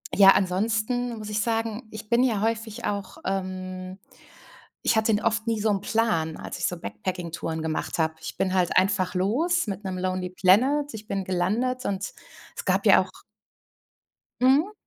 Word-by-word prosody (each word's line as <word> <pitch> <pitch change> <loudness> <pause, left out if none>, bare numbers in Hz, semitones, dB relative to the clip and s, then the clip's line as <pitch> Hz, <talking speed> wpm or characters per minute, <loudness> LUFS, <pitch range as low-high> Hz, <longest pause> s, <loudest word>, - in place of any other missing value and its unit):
ja, 195 -1 +8
ansonsten, 220 +6 0
muss 215 -1 -7
ich 210 0 0
sagen 225 0 -2
ich 215 0 -9
bin 235 +1 +4
ja 225 -6 +1
häufig 225 +1 -2
auch, 200 -2 -3
ähm 185 0 -4 0.9
ich 225 - +3
hatte 220 0 +3
n 205 - +1
oft 225 0 0
nie 225 -2 +1
so 220 - +2
'n 200 -2 +1
Plan, 185 -8 0
als - - -7
ich - - 0
so 180 - -3
Backpacking-Touren 165 - -4
gemacht 160 +1 -2
habe. 160 0 +1
Ich - - -6
bin 185 -1 0
halt 180 -2 +2
einfach 185 -1 +2
los 295 - +1
mit 200 0 -4
'nem 185 -1 -3
Lonely 185 0 -2
Planet, 255 +11 +3
ich 215 -1 -8
bin 195 -2 -2
gelandet 220 +9 0
und 195 -1 -2 0.4
es - - -5
gab - - +1
ja - - +7
auch - - -9 1.2
Mhm. 285 +10 +4
205 Hz, 175 wpm, -26 LUFS, 185-225 Hz, 1.2 s, ja